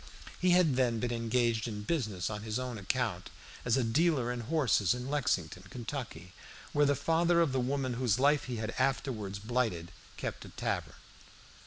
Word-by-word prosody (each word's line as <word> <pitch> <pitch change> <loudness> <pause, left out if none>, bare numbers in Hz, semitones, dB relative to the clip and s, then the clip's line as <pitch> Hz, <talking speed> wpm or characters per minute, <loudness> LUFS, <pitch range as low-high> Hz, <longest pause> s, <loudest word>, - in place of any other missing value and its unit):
He 180 - +4
had 175 -7 +4
then 120 -3 +2
been 120 +1 -1
engaged 115 -1 +1
in 105 -2 -5
business 110 - -1
on 105 -1 -4
his 110 +1 -2
own 125 -3 -4
account 100 -2 -1 0.3
as 120 +1 +2
a 130 - +2
dealer 130 +1 +2
in 125 - -3
horses 120 - +2
in 125 +1 -5
Lexington, 90 - 0
Kentucky, 115 - -6 0.4
where 145 0 +4
the 145 - +3
father 165 +4 +2
of 165 -5 +3
the 130 - +1
woman 130 0 -1
whose 120 -3 +1
life 145 +2 +3
he 125 - -4
had 110 0 -3
afterwards 125 -6 -1
blighted 110 -6 -1 0.3
kept - - -4
a - - -10
tavern. - - -3
125 Hz, 175 wpm, -32 LUFS, 110-140 Hz, 0.4 s, He